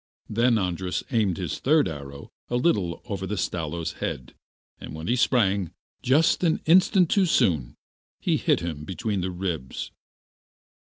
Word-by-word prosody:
Then 115 +2 +2
Andras 90 -2 -2
aimed 105 -8 +1
his 90 -4 -4
third 150 +2 +3
arrow 70 -3 -8 0.2
a 120 - -1
little 105 - 0
over 100 -5 -4
the 105 - -3
Stalo's 85 -2 -2
head, 65 -1 -4 0.5
and - - -8
when 80 +1 -7
he 120 - +1
sprang 100 -7 +2
up, - - -19 0.3
just 150 +8 +3
an 165 -2 +2
instant 185 +2 +5
too 195 -3 +3
soon, 80 - +1 0.5
it - - +2
hit - - +1
him 80 -3 -5
between 95 +4 -3
the 95 - -2
ribs. 90 -7 -4
95 Hz, 155 wpm, -25 LUFS, 85-125 Hz, 0.5 s, instant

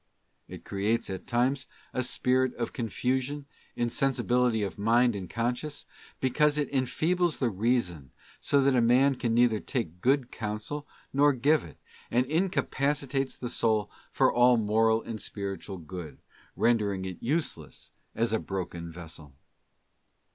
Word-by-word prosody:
It - - -10
creates 100 +2 -1
at 95 - -6
times 130 +3 +1 0.3
a 130 - 0
spirit 125 0 +1
of 120 - -3
confusion, 130 +4 -2 0.3
insensibility 120 -2 +1
of 100 0 -4
mind 120 +2 +3
and 95 -3 -6
conscience, 125 +6 -2 0.3
because 150 +3 +2
it 145 -1 -1
enfeebles 160 +6 +1
the 125 -4 0
Reason 95 - 0 0.3
so 140 -1 +2
that 135 -1 +3
a 125 - +4
man 125 +4 +5
can 120 -3 -1
neither 120 -2 +4
take 90 - -4
good 130 -1 +2
counsel 110 +7 -4 0.3
nor 145 +1 +5
give 145 +5 +3
it, 80 - -12 0.3
and 125 +2 +2
incapacitates 140 -4 0
the 125 - -4
soul 110 -3 +1 0.2
for - - +3
all 120 0 +5
moral 110 +1 +2
and 110 -2 -6
spiritual 100 -1 -5
good, 85 -2 -8 0.4
rendering 105 -5 +1
it 95 -2 -6
useless 125 - -3 0.2
as 115 0 +1
a 110 - +2
broken 85 -3 -5
vessel. 80 -4 -10
120 Hz, 140 wpm, -28 LUFS, 105-135 Hz, 0.4 s, man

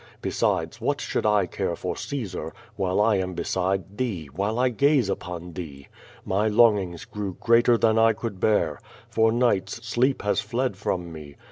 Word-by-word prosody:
Besides, - - -1
what - - 0
should - - -2
1 105 -3 +3
care - - -2
for - - -4
Caesar, 95 - -5 0.2
while 95 -3 -1
1 105 -1 +3
am 95 0 -2
be - - -2
side 95 +2 -2
thee, 95 - -3
while 100 +4 -1
1 125 +1 +2
gaze 140 -3 +3
upon 90 -2 -5
thee? 70 -5 -8 0.4
ily 105 +3 +1
longings 105 -6 +3
grew 100 -3 -5
greater 120 0 +4
than 110 -1 +3
I 115 0 +5
could 105 -3 -6
bear. 85 -9 +1 0.3
For 110 0 +3
nights 115 -2 0
sleep 125 +4 +1
has 105 - +1
fled 125 -3 -2
from 90 -3 -3
me. 75 -3 -10
105 Hz, 170 wpm, -25 LUFS, 90-115 Hz, 0.4 s, I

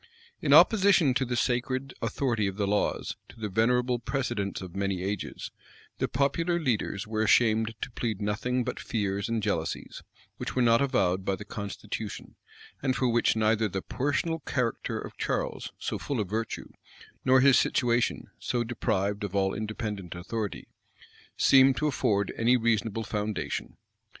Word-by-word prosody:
In - - 0
opposition 190 - +6
to 130 +1 +1
the 125 0 -2
sacred 130 +2 -1
authority 115 -2 0
of 95 - -3
the 105 - +1
laws, 105 +1 -1
to - - -15
the 105 -1 -3
venerable 125 +4 +2
precedents 120 -6 -2
of 95 -1 -9
many 95 -2 -1
ages, 100 0 -4 0.5
the - - +1
popular 165 +6 +1
leaders 115 - -1
were 110 0 -2
ashamed 110 0 +3
to - - -4
plead 115 -4 -3
nothing 115 +5 -1
but 125 - -4
fears 100 -2 -2
and 115 -2 -1
jealousies, 85 -6 -2 0.4
which - - -5
were 130 - +2
not 115 +1 +5
avowed 95 -9 +1
by 95 0 0
the 105 - -9
constitution, 100 +1 -6 0.5
and 130 -2 +1
for 125 -1 +1
which 120 -1 +3
neither 110 0 +2
the 95 -1 -4
personal 165 +5 -1
character 125 -5 -2
of - - -8
Charles, - - -2
so - - -3
full 140 -4 -3
of 105 - -1
virtue, 110 +3 -3 0.5
nor 130 0 +5
his 135 -1 +6
situation, 120 -1 +1
so 120 -1 -1
deprived 105 -3 -1
of 100 -1 -4
all 95 -1 +2
independent 105 -4 -4
authority, 105 +4 -4 0.7
seemed 135 -1 +6
to 150 - 0
afford 105 -8 +1
any 120 +2 +4
reasonable 115 -1 0
foundation. 105 0 -3
115 Hz, 155 wpm, -28 LUFS, 100-125 Hz, 0.7 s, opposition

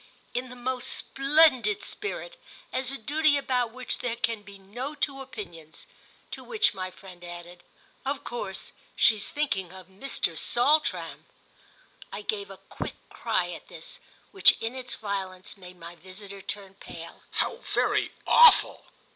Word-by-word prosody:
"In 250 +1 -2
the 250 - -9
most 250 +1 -2
splendid 270 -8 +4
spirit—as 420 - -3
a 275 - -3
duty 295 +5 +3
about 250 -4 +1
which 255 +1 -3
there 240 -2 -1
can 230 -2 -1
be 200 -1 -12
no 245 +10 -6
two 275 -2 -1
opinions." 175 -11 -9 0.5
To - - -6
which 435 - +2
my 185 -2 -4
friend 185 -1 -13
added: 175 0 -9 0.4
"Of 275 +1 -2
course 195 -5 -4 0.2
she's 210 -1 +4
thinking 275 - -1
of 185 -1 -11
Mr. 190 -4 -2
Saltram." 290 - +2 0.8
I - - -6
gave 410 -2 -2
a - - -9
quick - - -6
cry - - 0
at - - -9
this, - - -8 0.3
which, 390 - +6
in 225 +2 -2
its 255 -1 -3
violence, 190 -3 -4
made 180 -2 -12
my 170 0 -9
visitor 195 +3 -8
turn 195 0 -6
pale. 195 - -10
"How 470 - +1
very - - +1
awful!" 480 0 +7
230 Hz, 145 wpm, -28 LUFS, 190-275 Hz, 0.8 s, awful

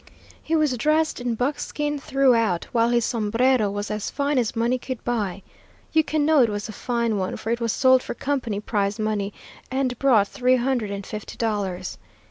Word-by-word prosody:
He 325 - -1
was 305 -5 +2
dressed 310 +1 +1
in 240 -1 -1
buckskin 295 +3 -2
throughout, 240 -10 +2
while 230 -1 +3
his 240 -1 +2
sombrero 230 +1 +2
was 205 +1 -4
as 210 -1 -3
fine 285 -1 0
as 235 -1 -1
money 235 +3 +1
could 255 -1 -6
buy. 205 -6 -2 0.5
You 320 0 +5
can 305 -1 0
know 310 -2 +5
it 235 - +4
was 205 0 -3
a - - -6
fine 235 -3 -1
one, 185 -1 -2
for 225 - -4
it 235 0 -1
was 230 -1 +1
sold 260 +2 +4
for - - -6
company 255 -8 -2
prize 205 -1 -1
money, 215 -2 -1 0.4
and 260 -2 -1
brought 235 -7 +4
three 255 +3 +2
hundred 245 -3 0
and 200 -1 -5
fifty 215 -1 -7
dollars. 195 -5 -2
235 Hz, 190 wpm, -24 LUFS, 210-265 Hz, 0.5 s, You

